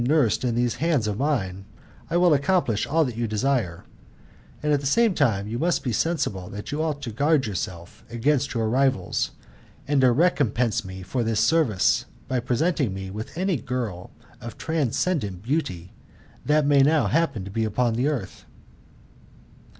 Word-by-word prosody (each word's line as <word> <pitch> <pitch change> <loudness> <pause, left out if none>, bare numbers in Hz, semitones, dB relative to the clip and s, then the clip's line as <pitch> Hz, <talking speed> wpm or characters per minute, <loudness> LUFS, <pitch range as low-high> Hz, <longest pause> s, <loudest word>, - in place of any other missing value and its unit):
nursed 135 -4 +2
in 120 -2 0
these 120 0 0
hands 155 -8 +2
of 105 -1 -2
mine, 100 -10 -1 0.5
I 170 - +1
will 175 -2 +5
accomplish 140 - +1
all 160 +1 +2
that 125 -4 -4
you 115 0 -1
desire; 110 -5 -1 0.8
and 150 0 +2
at 145 - +3
the 140 - -3
same 230 - +3
time 110 - +1
you 115 +3 -4
must 170 +3 +1
be 125 - -1
sensible 105 - -1
that 105 +5 -7
you 150 +2 -1
ought 150 -3 -2
to 120 - -4
guard 140 +3 +2 0.6
against 135 +4 0
your 115 -1 0
rivals, 130 -6 +1 0.6
and 140 -1 +2
to 130 -1 +5
recompense 125 - +1
me 95 0 -8
for 120 +7 -2
this 110 -1 0
service, 110 - +2 0.2
by 130 -1 0
presenting 125 - 0
me 95 0 -6
with 110 +9 -7
any 185 -2 +1
girl 120 -8 -4 0.3
of 115 -1 -8
transcendent 140 - -1
beauty 100 - -2 0.5
that 150 0 +2
may 145 -1 +4
now 150 +2 +4
happen 155 - 0
to 100 - -8
be 115 +3 -1
upon 115 +2 0
the 125 +5 0
earth." 125 -11 -4
125 Hz, 165 wpm, -24 LUFS, 110-150 Hz, 0.8 s, will